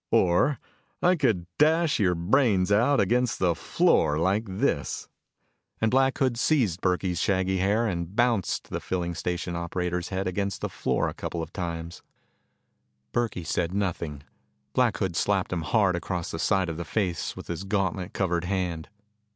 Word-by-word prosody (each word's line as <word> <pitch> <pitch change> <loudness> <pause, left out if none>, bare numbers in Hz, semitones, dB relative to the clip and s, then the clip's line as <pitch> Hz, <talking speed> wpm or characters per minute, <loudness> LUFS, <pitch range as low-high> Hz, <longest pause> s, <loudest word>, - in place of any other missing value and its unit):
"Or 90 +11 +3 0.5
I 180 +1 +5
could 115 - +1
dash 155 -1 +3
your 90 -4 +3
brains 100 +1 +2
out 120 +7 +4
against 120 +4 +2
the 90 -2 +2
floor 75 -2 +2
like 95 +7 +1
this." 95 0 -1 0.7
And 110 - +2
Black 135 +1 +3
Hood 130 -3 +1
seized 115 - +2
Burkey's 90 -1 0
shaggy 95 -1 +1
hair 105 +5 +2
and 90 -2 -3
bounced 120 -5 +1
the - - -2
filling 85 -2 -2
station 85 +1 -3
operator's 90 +1 -2
head 95 0 -2
against 100 +1 -2
the - - -2
floor - - 0
a - - -3
couple 85 -1 -4
of 80 - -9
times. 85 -2 -5 1.1
Burkey 115 -7 -1
said 85 +3 -1
nothing. 85 -7 -2 0.5
Black 120 -7 +2
Hood 95 -3 -2
slapped 95 -1 +1
him 85 - -1
hard 95 +2 +2
across 85 -1 -3
the 80 - -5
side 95 -1 +2
of 80 -1 -4
the 85 - -3
face 90 -3 -2
with - - -8
his 85 +2 -5
gauntlet 95 -2 -1
covered 90 -3 -1
hand. 90 -4 -2
95 Hz, 160 wpm, -26 LUFS, 85-110 Hz, 1.1 s, I